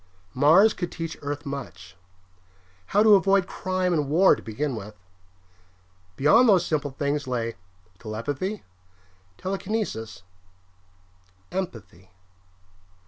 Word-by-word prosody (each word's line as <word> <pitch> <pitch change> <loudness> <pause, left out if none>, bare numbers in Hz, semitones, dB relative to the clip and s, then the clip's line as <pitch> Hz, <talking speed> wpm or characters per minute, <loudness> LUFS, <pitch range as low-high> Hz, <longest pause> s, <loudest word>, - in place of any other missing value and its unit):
Mars 165 +11 +5
could 175 -2 -5
teach 165 -1 -5
Earth 145 +1 -5
much. 90 - -8 0.9
How 205 +2 +3
to 220 -1 +7
avoid 195 -1 +4
crime 185 -1 -2
and 150 -4 0
war 175 +6 +5
to - - -11
begin 130 +5 -3
with. 105 -1 -8 1.2
Beyond 225 - +5
those 185 -4 +4
simple 150 -2 -1
things 140 +1 -2
lay 115 -2 -2 0.5
telepathy, 140 - -4 0.7
telekinesis, 195 - -4 1.3
empathy.... 115 - -6
150 Hz, 100 wpm, -25 LUFS, 120-190 Hz, 1.3 s, to